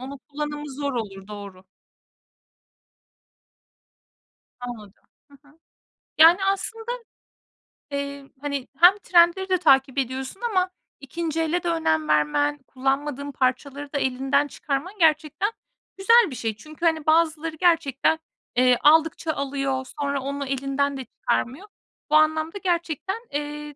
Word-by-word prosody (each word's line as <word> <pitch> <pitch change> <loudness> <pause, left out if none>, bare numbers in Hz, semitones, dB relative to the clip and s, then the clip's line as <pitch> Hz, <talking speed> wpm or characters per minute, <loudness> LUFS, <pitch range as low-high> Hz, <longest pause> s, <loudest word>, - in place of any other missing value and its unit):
Onun 270 +2 -8
kullanımı 295 0 -6
zor 280 0 -2
olur, 195 -5 -5
doğru. 200 -3 -9 3.0
Anladım. 220 -5 -9 0.3
Hı - - -18
hı. 305 +3 -24 0.6
Yani, 340 +5 +7
aslında 445 +4 -2 1.0
Eee, 280 0 -4 0.2
hani, 280 -3 -3
hem 355 +4 +7
trendleri 355 +2 +4
de 370 - +3
takip 270 -4 +3
ediyorsun 265 - -3
ama 375 -6 +1 0.3
2'nci 325 +3 -3
ele 335 +2 0
de - - -3
önem 160 - +1
vermen, 155 - +2
kullanmadığın 280 +2 -2
parçaları 280 +2 -2
da - - 0
elinden 270 +2 +1
çıkarman 285 +7 -4
gerçekten 315 +5 +2 0.5
güzel 460 +2 +5
bir - - -6
şey. 225 -2 -3
Çünkü, 310 +7 -8
hani, 320 -2 +1
bazıları 320 0 +2
gerçekten, 320 -3 +2 0.4
eee, 250 0 +4
aldıkça 320 +1 +4
alıyor 275 -1 -2 0.2
sonra 280 -1 -1
onu 280 +1 -4
elinden 275 +1 -1
de 260 - -6
çıkarmıyor. 280 - -2 0.4
Bu 305 - +3
anlamda 315 +4 +2
gerçekten, 350 +1 -2
eee, 295 0 -5
290 Hz, 120 wpm, -24 LUFS, 265-325 Hz, 3.0 s, Yani